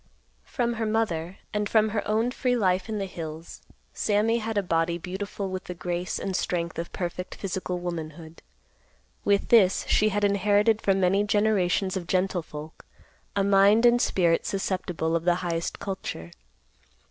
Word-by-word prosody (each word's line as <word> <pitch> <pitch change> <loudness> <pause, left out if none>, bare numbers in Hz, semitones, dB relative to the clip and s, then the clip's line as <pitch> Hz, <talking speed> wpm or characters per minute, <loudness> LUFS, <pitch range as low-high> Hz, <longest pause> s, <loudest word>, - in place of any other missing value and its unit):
From 240 -2 -1
her - - +1
mother, 190 -6 -1 0.2
and 210 -1 -1
from 220 -1 +3
her 210 0 -1
own 225 +3 +1
free 250 -1 0
life 185 -2 +1
in 215 - -2
the 200 - -2
hills, 165 -3 -8 0.3
Sammy 220 +2 +1
had 225 -1 -3
a 200 - +2
body 170 -1 0
beautiful 190 +2 -5
with 185 0 -5
the 180 - -6
grace 175 +2 -3
and 190 -1 -3
strength 170 -2 -2
of 170 - -5
perfect 180 0 -4
physical 185 -2 -3
womanhood. 165 -2 -6 0.8
With 200 -1 +1
this, 195 -6 +5
she 215 - +3
had 205 0 -1
inherited 205 +2 +3
from 195 -1 +2
many 190 +2 +3
generations 205 -3 +1
of 180 -3 -4
gentle 185 -1 +1
folk 155 0 -10 0.5
a 200 - +2
mind 200 +3 +5
and 240 0 +5
spirit 170 -3 +2
susceptible 180 -4 -1
of 165 - 0
the 175 0 +3
highest 170 -1 -2
culture. 130 - -5
190 Hz, 160 wpm, -26 LUFS, 175-210 Hz, 0.8 s, this